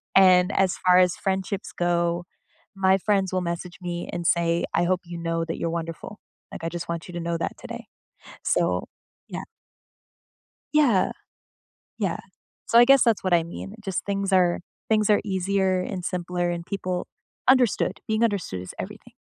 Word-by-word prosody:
And, 185 0 +6
as 190 -2 +2
far 180 0 +7
as 180 -1 +4
friendships 190 +1 -2
go, 175 0 0 0.5
my 190 0 +4
friends 195 -1 +1
will 185 - +2
message 170 +1 -4
me 175 -1 -4
and 175 0 -4
say, 170 0 +2
"I 170 - +3
hope 185 0 +1
you 170 0 -7
know 165 0 -1
that 165 - -4
you're 170 - -2
wonderful. 165 +4 -5 0.3
Like, - - -8
I - - 0
just 170 0 -6
want 170 -1 -4
you 180 - -10
to 175 - -4
know 170 0 -1
that - - -2
today." - - -8 0.6
So, - - +1 0.4
yeah. - - -5 1.3
Yeah. 275 -11 +4 0.9
Yeah. - - -1 0.5
So, 235 - +5
I 240 - +8
guess 275 0 +6
that's 230 -4 +2
what 185 -2 +1
I 170 -1 +4
mean. 195 +4 -8
Just 190 -2 -2
things 195 -1 -1
are 180 -2 +4 0.3
things 215 -1 +3
are 210 - +4
easier 190 -1 +1
and 180 0 -4
simpler 175 -1 -2
and 170 -1 -3
people 185 -2 -3 0.4
understood, 255 -3 +3
being 220 +1 +1
understood 195 - -1
is 90 - -8
everything. - - -8
180 Hz, 170 wpm, -25 LUFS, 170-195 Hz, 1.3 s, I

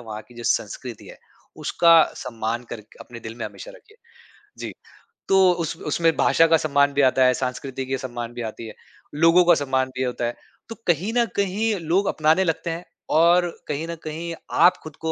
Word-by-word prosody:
वहाँ 110 -2 -8
की 120 - -17
जो 120 - -9
संस्कृति 115 +2 -2
है। - - -13 0.5
उसका 165 -1 +6
सम्मान 115 -1 -4
करके 110 -1 -10
अपने 120 -1 -10
दिल 110 0 -8
में 115 - -4
हमेशा - - -10
रखिए। 435 -3 -19 0.6
जी, - - -6 0.6
तो 190 -1 +5
उस 170 -3 -3
उसमें 165 +2 0
भाषा 165 - +4
का 165 0 +5
सम्मान 145 -2 +2
भी 140 - +2
आता 130 -1 +4
है, 125 - +4
सांस्कृति 130 +1 -4
कि 135 +1 -2
सम्मान 120 -2 -6
भी 120 - -6
आती 115 - -10
है, - - -10 0.4
लोगों 165 +3 +5
का 175 - +6
सम्मान 130 -1 0
भी 130 - -3
ये 130 - +1
होता 120 -1 -3
है। 120 - -3 0.3
तो 225 - -6
कहीं 175 +6 +1
न 240 - +4
कहीं 200 +3 0
लोग 180 +5 +1
अपनाने 155 +4 +2
लगते 165 0 -2
हैं 165 +2 -5 0.3
और 175 +1 +4 0.2
कहीं 150 +3 -3
न 170 - -5
कहीं 165 +2 -5 0.3
आप 180 - +5
खुद 155 -2 -10
को 160 0 -1
155 Hz, 205 wpm, -23 LUFS, 125-170 Hz, 0.6 s, उसका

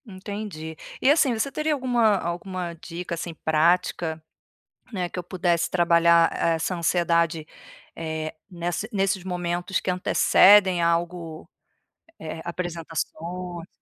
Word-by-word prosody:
Entendi. 190 -5 -7 0.3
E 265 - +5
assim, 290 -4 +3
você 225 +5 -1
teria 305 +1 0
alguma 240 -6 +2
alguma 175 0 -4
dica, 170 +1 -7
assim, 170 0 -4
prática, 160 +1 +1 0.7
né, 185 -5 -2
que 180 - -6
eu - - -5
pudesse 175 -1 0
trabalhar 170 -1 +4
essa 165 +2 0
ansiedade, 170 -2 +1 0.5
eh, 160 -1 -4 0.2
nessa 175 +3 -3
nesses 195 -2 0
momentos 175 0 -2
que - - -1
antecedem 185 0 +5
algo, 170 -1 -1 0.7
eh, 160 0 -6
apresentações? 170 0 -5
175 Hz, 115 wpm, -25 LUFS, 165-190 Hz, 0.7 s, E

